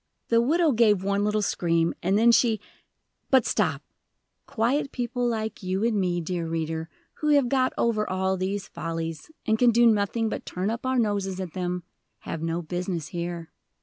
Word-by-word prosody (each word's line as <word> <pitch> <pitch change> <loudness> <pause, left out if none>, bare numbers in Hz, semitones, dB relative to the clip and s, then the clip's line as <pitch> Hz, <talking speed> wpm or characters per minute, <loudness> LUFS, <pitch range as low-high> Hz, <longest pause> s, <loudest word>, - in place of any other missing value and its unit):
The 230 0 +4
widow 320 +5 +3
gave 215 -5 +3
one 200 +1 +1
little 210 0 +1
scream, 170 -3 +1
and 190 +3 +2
then 235 +2 +6
she 230 -2 +3 0.7
But, 260 -3 +5
stop! - - 0 0.6
Quiet 255 +5 0
people 245 0 -2
like 220 -2 -3
you 190 +2 -1
and 225 -3 +2
me, 175 -1 0
dear 170 0 -3
reader, 160 0 -3 0.3
who 300 - -2
have 280 -3 +4
got 260 -1 +2
over 215 -2 +1
all 190 0 0
these 190 +1 -3
follies, 165 - -5 0.2
and 220 0 +1
can 245 - +6
do 235 +1 +4
nothing 220 +1 +2
but - - -4
turn 185 +4 -2
up 235 +3 -4
our 260 0 +1
noses 200 -4 0
at 185 -4 -5
them, 180 -1 -3 0.4
have 165 - -5
no 165 +1 -2
business 175 -1 -3
here. 170 -2 -5
200 Hz, 180 wpm, -26 LUFS, 175-235 Hz, 0.7 s, then